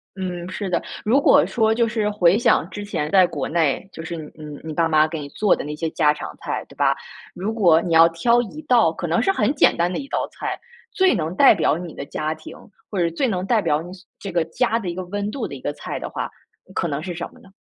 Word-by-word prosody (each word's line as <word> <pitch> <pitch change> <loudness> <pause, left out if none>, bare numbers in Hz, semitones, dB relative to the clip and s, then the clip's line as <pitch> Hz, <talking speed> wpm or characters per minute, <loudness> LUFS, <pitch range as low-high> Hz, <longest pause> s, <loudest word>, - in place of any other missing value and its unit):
嗯， 180 -2 -4
是 195 +1 -4
的， 175 - +1 0.2
如 240 +6 +3
果 - - +5
说 220 -2 +2
就 230 0 +2
是 220 -2 -1
回 200 -2 +3
想 175 -7 +2
之 205 +1 -7
前 150 -7 -2
在 185 +1 +6
国 150 -6 -4
内， 165 +2 0
就 165 - -8
是 170 - -5
你 155 -2 -8
你 150 -2 -9
你 160 - -6
爸 165 +1 +2
妈 155 -1 +4
给 160 0 -5
你 145 - -6
做 205 +6 +2
的 - - -5
那 150 +1 -5
些 160 +1 -2
家 150 -2 +3
常 150 - -8
菜， - - -4
对 - - -17
吧？ - - +2 0.4
如 195 +5 -3
果 175 -8 +4
你 170 -2 -2
要 165 +1 +8
挑 235 +9 +2
1 300 +8 -9
道， 235 - +4
可 175 - -4
能 165 - +1
是 390 - +3
很 385 - +1
简 - - +4
单 175 +1 +1
的 - - -3
一 275 - -6
道 - - -1
菜， - - -4 0.3
最 380 - +3
能 165 -1 -2
代 275 - +7
表 155 - +1
你 175 -2 -8
的 140 - -6
家 155 +2 -3
庭， 320 - -11 0.4
或 195 - -2
者 170 - +2
最 170 +11 -1
能 185 -5 -1
代 230 0 +3
表 160 -6 +1
你 175 +2 -9
所 190 0 -13
这 200 - -6
个 170 -2 +1
家 230 +7 0
的 205 -6 -5
一 175 - -2
个 185 +1 -5
温 205 +3 -3
度 275 - -3
的 - - -8
一 - - -10
个 - - -3
菜 - - -6
的 - - -5
话， - - -4 0.5
可 170 - 0
能 145 -1 -3
是 175 +1 -5
什 175 - -4
么 - - -18
呢？ 195 - -18
180 Hz, 290 characters per minute, -22 LUFS, 160-210 Hz, 0.5 s, 要